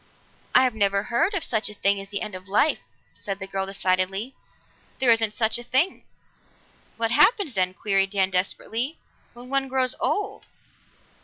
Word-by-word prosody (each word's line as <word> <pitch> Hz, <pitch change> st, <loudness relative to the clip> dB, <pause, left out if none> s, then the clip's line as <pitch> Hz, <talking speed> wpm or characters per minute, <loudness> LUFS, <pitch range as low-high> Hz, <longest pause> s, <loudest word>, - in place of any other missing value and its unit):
"I 255 Hz, -, +7 dB
never 200 Hz, -3 st, 0 dB
heard 325 Hz, -, +2 dB
of 355 Hz, -, 0 dB
such 220 Hz, -2 st, +1 dB
a 210 Hz, -, -11 dB
thing 200 Hz, 0 st, +1 dB
as 195 Hz, 0 st, -8 dB
the 200 Hz, 0 st, -3 dB
end 210 Hz, -, -7 dB
of 185 Hz, 0 st, -9 dB
life!" 215 Hz, +10 st, +2 dB, 0.3 s
said 195 Hz, -1 st, -5 dB
the 190 Hz, -, -5 dB
girl 195 Hz, 0 st, -3 dB
decidedly. 195 Hz, +4 st, -1 dB, 0.6 s
"There 255 Hz, -3 st, +4 dB
isn't 225 Hz, -2 st, +3 dB
such 225 Hz, +1 st, +2 dB
a -, -, -8 dB
thing." 265 Hz, +10 st, 0 dB, 0.9 s
"What 230 Hz, 0 st, 0 dB
happens, 300 Hz, -, +4 dB
then," 185 Hz, -2 st, 0 dB
queried 195 Hz, -2 st, +1 dB
Dan 195 Hz, -1 st, 0 dB
desperately, 225 Hz, -, -2 dB, 0.4 s
"when 245 Hz, +1 st, -12 dB
one 275 Hz, 0 st, 0 dB
grows 255 Hz, -1 st, +1 dB
old?" 410 Hz, 0 st, -2 dB
220 Hz, 165 wpm, -24 LUFS, 195-255 Hz, 0.9 s, I